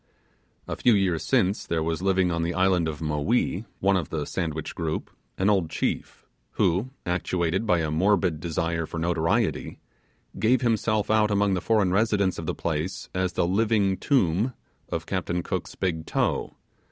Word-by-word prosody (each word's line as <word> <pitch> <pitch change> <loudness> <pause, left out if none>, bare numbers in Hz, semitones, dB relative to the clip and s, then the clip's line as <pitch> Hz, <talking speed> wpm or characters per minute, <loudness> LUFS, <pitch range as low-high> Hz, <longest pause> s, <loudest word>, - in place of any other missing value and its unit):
A - - -3
few 120 -3 +4
years 95 -5 +1
since 95 +3 +1
there 80 -1 0
was 80 +1 -2
living 95 -2 +2
on 85 0 -1
the 85 +1 -1
island 95 -3 +3
of 80 0 -4
Maui 85 +7 0 0.2
(one 100 0 +3
of 85 -6 -1
the 75 -2 -2
Sandwich 80 -4 -3
group) 80 -1 -3 0.3
an 95 - +1
old 95 -6 +2
chief, - - -3 0.3
who, 95 +9 +1 0.2
actuated 90 +3 -1
by 90 -3 +3
a 80 -1 -1
morbid 90 -1 +2
desire 80 0 -2
for - - -6
notoriety, 85 0 0 0.6
gave 125 +4 +3
himself 110 -3 +1
out 110 -1 +4
among 100 -1 +2
the 90 - 0
foreign 105 -2 +2
residents 100 -2 +2
of - - -6
the - - -1
place 80 +3 -3
as 90 -1 -1
the - - +1
living 100 +1 +2
tomb 110 - +1 0.4
of - - -3
Captain 90 0 -2
Cook's - - -4
big 85 -4 -2
toe! - - 0
90 Hz, 165 wpm, -26 LUFS, 80-100 Hz, 0.6 s, few